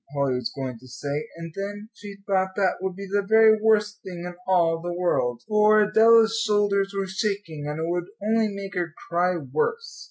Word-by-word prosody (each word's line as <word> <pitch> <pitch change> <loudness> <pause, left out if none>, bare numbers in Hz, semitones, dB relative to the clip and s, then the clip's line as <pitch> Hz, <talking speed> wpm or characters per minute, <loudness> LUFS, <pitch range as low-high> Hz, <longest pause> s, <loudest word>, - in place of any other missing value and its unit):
Polly 140 -2 +1
was 125 -2 -3
going 130 -4 -5
to 130 - -16
say. 145 +4 -4
And 165 -1 -8
then 205 +2 -6
she 205 -2 -10
thought 190 -1 0
that 195 -2 +1
would 190 -1 -3
be 200 +1 -7
the 200 +1 0
very 220 +1 +5
worst 210 -1 +2
thing 175 -2 -8
in 180 - -6
all 165 -3 +2
the 175 +1 -4
world, 135 -9 -1
for 215 0 +4
Adela's 225 +1 +5
shoulders 205 -2 +1
were 195 - 0
shaking, 190 -6 -3
and 150 +1 -4
it 160 - -2
would 175 0 -2
only 220 +2 +1
make 200 -2 -7
her 175 -3 -3
cry 175 +2 +1
worse. 460 - -3
195 Hz, 195 wpm, -24 LUFS, 165-210 Hz, -, very